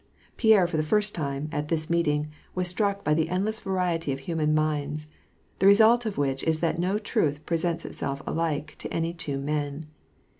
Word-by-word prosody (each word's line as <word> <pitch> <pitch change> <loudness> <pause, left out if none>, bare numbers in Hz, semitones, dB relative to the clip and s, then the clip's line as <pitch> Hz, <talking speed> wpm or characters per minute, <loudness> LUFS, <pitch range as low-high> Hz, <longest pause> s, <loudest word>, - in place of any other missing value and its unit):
Pierre 220 -5 +5
for 170 -2 -2
the - - +2
first 210 +6 +2
time, 140 -2 -3
at 150 -1 -2
this 155 -1 0
meeting, 150 -3 +1 0.2
was 180 -1 0
struck 200 +2 0
by 150 - +2
the 160 +1 +1
endless 205 +5 -1
variety 180 -5 -1
of 135 0 -4
human 155 0 0
minds, 150 0 -1 0.5
the 195 - +4
result 225 +4 +6
of 210 - -4
which 135 -1 0
is 160 -1 +2
that 165 0 0
no 185 +4 +1
truth 155 - -1
presents 165 0 -1
itself 140 0 -4
alike 155 -2 -2
to - - -6
any 165 +1 -1
two 155 -5 -2
men. 145 +1 -3
165 Hz, 185 wpm, -26 LUFS, 150-185 Hz, 0.5 s, result